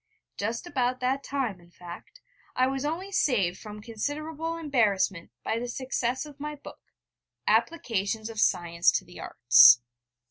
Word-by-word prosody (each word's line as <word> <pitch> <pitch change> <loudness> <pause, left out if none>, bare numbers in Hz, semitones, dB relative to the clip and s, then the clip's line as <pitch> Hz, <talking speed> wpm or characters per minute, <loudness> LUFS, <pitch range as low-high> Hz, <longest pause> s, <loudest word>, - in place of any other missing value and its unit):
Just 225 - -3
about 255 -6 -1
that 265 +2 0
time, 250 -11 -3
in 170 - -20
fact, 175 - -12 0.3
I 255 - +3
was 270 +1 -2
only 350 +6 -3
saved 200 - +1
from 210 -1 -10
considerable 305 +8 -4
embarrassment 210 - 0
by 225 - -1
the 245 - -4
success 255 +1 -2
of 290 -1 -13
my 300 +1 -5
book, 285 - -12 0.7
'Applications 225 - 0
of 225 -2 -4
Science 170 -1 +2
to - - -1
the 175 - -13
Arts.' 120 0 +7
245 Hz, 145 wpm, -27 LUFS, 195-290 Hz, 0.7 s, Arts